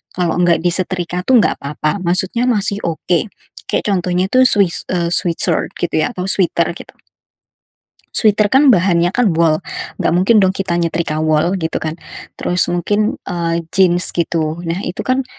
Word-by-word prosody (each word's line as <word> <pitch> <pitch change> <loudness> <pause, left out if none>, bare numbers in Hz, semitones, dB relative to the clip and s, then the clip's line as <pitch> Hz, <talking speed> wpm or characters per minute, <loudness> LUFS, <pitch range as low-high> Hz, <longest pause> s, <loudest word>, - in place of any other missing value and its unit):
kalau 180 -1 -1
enggak 175 -2 +2
disetrika, 175 0 -2
tuh, 250 -4 +5
enggak - - -1
apa-apa, 150 +6 -3
maksudnya, 185 +7 0
masih 205 -4 0
oke, 170 +3 -1 0.4
kayak - - -1
contohnya, 180 -1 0
tuh 255 0 +4
sweat 200 -7 +1
eee, 170 -2 -1
sweat 175 -1 +3
shirt, - - +2
gitu, 175 - -2
ya, - - -2
atau 180 - -4
sweater, 175 -3 +2
gitu. - - -13 1.2
Sweater, 215 -1 +3
kan, 265 +7 +4
bahannya, 175 -5 +3
kan, 210 -2 +1
wol. 160 -1 +2 0.4
Enggak - - 0
mungkin, 185 +6 +3
dong, 190 -2 +3
kita 185 -3 -2
nyetrika 165 -2 -2
wol, 155 +4 +1
gitu, 160 -3 -3
kan? 160 +1 -4 0.4
Terus, 180 0 0
mungkin, 205 +5 -1
eee, 170 -1 -2
jeans, 180 -2 +2
gitu. 165 -1 -2
Nah, 165 0 -3
itu, 175 - -4
kan, 260 +1 -1
175 Hz, 165 wpm, -16 LUFS, 170-195 Hz, 1.2 s, tuh